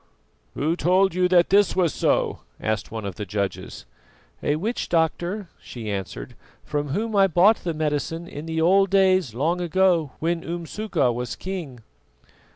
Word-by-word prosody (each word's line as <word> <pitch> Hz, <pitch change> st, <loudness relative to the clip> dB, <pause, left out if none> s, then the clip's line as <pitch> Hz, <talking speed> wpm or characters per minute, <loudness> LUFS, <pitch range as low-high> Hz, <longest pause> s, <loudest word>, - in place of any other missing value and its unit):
"Who 155 Hz, +4 st, 0 dB
told 185 Hz, +3 st, +3 dB
you 180 Hz, 0 st, +2 dB
that 180 Hz, -1 st, +3 dB
this 200 Hz, -1 st, +4 dB
was 180 Hz, -4 st, +2 dB
so?" -, -, +1 dB, 0.2 s
asked 110 Hz, 0 st, -2 dB
one 110 Hz, -2 st, -5 dB
of 100 Hz, -3 st, -5 dB
the 105 Hz, -, -4 dB
judges. 100 Hz, 0 st, -4 dB, 0.6 s
"A 145 Hz, -, +1 dB
witch 215 Hz, +10 st, -3 dB
doctor," 175 Hz, +4 st, 0 dB
she 110 Hz, -4 st, -7 dB
answered, 95 Hz, -11 st, -5 dB, 0.3 s
"from 145 Hz, 0 st, -2 dB
whom 215 Hz, +9 st, -2 dB
I 195 Hz, -1 st, +5 dB
bought 190 Hz, +5 st, +5 dB
the 170 Hz, -2 st, -4 dB
medicine 155 Hz, +2 st, -2 dB
in 150 Hz, 0 st, -8 dB
the 160 Hz, 0 st, -2 dB
old 195 Hz, +3 st, +4 dB
days, 185 Hz, -, +3 dB
long 165 Hz, +8 st, 0 dB
ago, 175 Hz, -4 st, +2 dB
when 165 Hz, +1 st, -1 dB
Umsuka 170 Hz, -, -1 dB
was 125 Hz, 0 st, -4 dB
king." 170 Hz, -11 st, -6 dB
170 Hz, 160 wpm, -24 LUFS, 145-185 Hz, 0.6 s, I